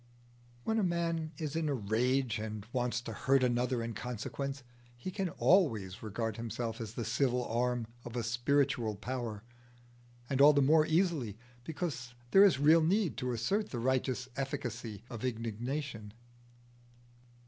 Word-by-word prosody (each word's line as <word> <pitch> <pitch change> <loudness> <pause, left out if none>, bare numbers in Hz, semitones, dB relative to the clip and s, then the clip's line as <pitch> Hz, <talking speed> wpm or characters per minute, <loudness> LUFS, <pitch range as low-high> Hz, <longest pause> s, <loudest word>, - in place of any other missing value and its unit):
When 225 0 +1
a - - +2
man 170 -3 0
is 155 -1 -4
in 160 -2 0
a 140 - +1
rage 120 +2 +1
and 110 -1 -5
wants 120 -2 0
to 115 - -6
hurt 135 +4 +2
another 125 0 +1
in 115 0 -4
consequence, 135 +4 -4 0.3
he 185 +10 -5
can 195 -2 -2
always 115 - +2
regard 110 0 -3
himself 115 0 -4
as 110 0 -6
the 120 - -3
civil 125 -3 +1
arm 120 0 0 0.2
of 120 0 -8
a 120 - -1
spiritual 120 -1 +1
power, 115 -1 -4 0.8
and 135 +1 +1
all 150 +1 +9
the 145 - +3
more 155 +3 +5
easily 160 - +1 0.3
because 140 -6 -4 0.2
there 195 - +8
is 195 -9 +6
real 155 +4 +6
need 185 +2 +2
to 125 -1 -1
assert 195 - 0
the 125 - -4
righteous 130 +1 0
efficacy 125 -6 -4
of 120 -3 -7
indignation. 115 -1 -3
125 Hz, 150 wpm, -32 LUFS, 115-145 Hz, 0.8 s, all